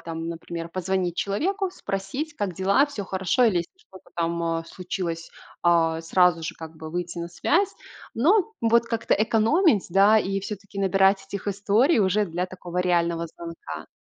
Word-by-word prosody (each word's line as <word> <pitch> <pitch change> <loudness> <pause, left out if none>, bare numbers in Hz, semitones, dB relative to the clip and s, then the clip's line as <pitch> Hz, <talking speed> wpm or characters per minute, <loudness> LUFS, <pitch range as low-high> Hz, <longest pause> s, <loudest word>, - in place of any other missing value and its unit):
там, 165 0 -5
например, 170 0 -6
позвонить 185 0 -2
человеку, 375 - -1
спросить: 260 - -4
"Как 200 -8 -3
дела? 195 - +3
Все 250 -9 -6
хорошо?" 190 +6 +1
Или 210 -7 +3
если 170 - -5
что-то 190 - -17
там, 170 0 -1
а, 165 0 -1
случилось, 170 -2 -5 0.3
а, 165 -2 +3
сразу 170 0 +3
же 160 - -4
как 160 0 -10
бы 160 0 -8
выйти 175 +1 -4
на 170 0 -4
связь. 370 - +1 0.4
Но 380 - +3
вот 230 +1 +4
как-то 230 -1 0
экономить, 225 - +3
да, 200 +4 +6
и 195 -1 -1
все-таки 200 0 -7
набирать 195 0 +3
этих 200 +1 -5
историй 205 - +2
уже 205 +1 +2
для 175 +1 -2
такого 180 -1 -6
реального 170 -2 +1
звонка. 165 - -9
190 Hz, 165 wpm, -25 LUFS, 170-215 Hz, 0.4 s, да